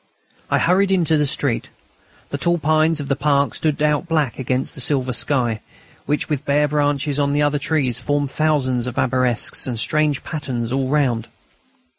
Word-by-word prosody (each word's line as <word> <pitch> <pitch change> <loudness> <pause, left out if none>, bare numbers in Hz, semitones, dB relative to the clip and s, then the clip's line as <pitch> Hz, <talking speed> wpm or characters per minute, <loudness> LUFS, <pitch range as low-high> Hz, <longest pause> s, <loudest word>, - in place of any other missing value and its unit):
I - - +3
hurried 190 +3 +3
into 170 -5 +2
the 150 -1 +2
street. 135 -3 -1 0.6
The - - -4
tall 170 0 +2
pines 155 0 +2
of 145 - -5
the 140 - +1
park 140 0 +1
stood 150 -1 -1
out 150 +3 +1
black 155 -8 0
against 130 0 -1
the - - -5
silver 130 -1 +1
sky, 120 -4 -1 0.5
whilst 150 +1 0
the 150 - 0
bare 145 +2 +1
branches 145 -1 0
of 140 0 +1
the 145 0 +2
other 145 0 +1
trees 135 -5 0
formed 145 +2 -1
thousands 130 -6 0
of 125 - -6
arabesques 125 -1 +1
and 120 -3 -3
strange 150 +1 +1
patterns 125 -7 -4
all 135 0 0
round. 130 -5 +1
145 Hz, 175 wpm, -20 LUFS, 130-150 Hz, 0.6 s, I